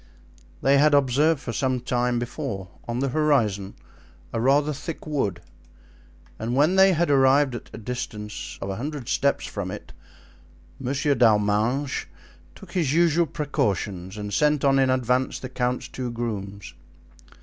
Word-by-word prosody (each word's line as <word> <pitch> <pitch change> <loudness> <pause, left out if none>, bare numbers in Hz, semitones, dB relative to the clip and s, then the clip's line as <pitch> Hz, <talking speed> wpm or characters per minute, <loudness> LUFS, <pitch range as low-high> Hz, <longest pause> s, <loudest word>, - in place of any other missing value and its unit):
They 140 +1 +5
had 150 0 +5
observed 140 +3 +3
for 115 - -5
some 130 +2 0
time 125 0 0
before 120 -4 -4
them, 90 - -23
on 120 +1 -2
the 135 - 0
horizon, 120 -10 +1 0.6
a 115 - -1
rather 145 +4 +3
thick 155 +3 -7
wood; 135 - -2 1.0
and 115 +3 -2
when 150 +7 +3
they 190 0 +6
had 170 -2 +1
arrived 135 0 +4
at 120 - -7
a - - -9
distance 105 -2 -6
of 95 - -3
a 95 - -4
hundred 145 -1 -5
steps 140 0 +1
from 100 -3 -5
it, - - -8 0.9
Monsieur 140 +2 0
d'Arminges 110 +3 +2 0.5
took 185 - -13
his 160 -6 0
usual 170 0 +3
precautions 100 - -2
and 105 -1 -5
sent 150 +3 +2
on 135 0 +4
in 135 -1 +3
advance 130 0 +1
the 130 - -7
count's 125 -1 -2
two 125 -2 -5
grooms. 100 -5 -5
130 Hz, 150 wpm, -24 LUFS, 110-145 Hz, 1.0 s, they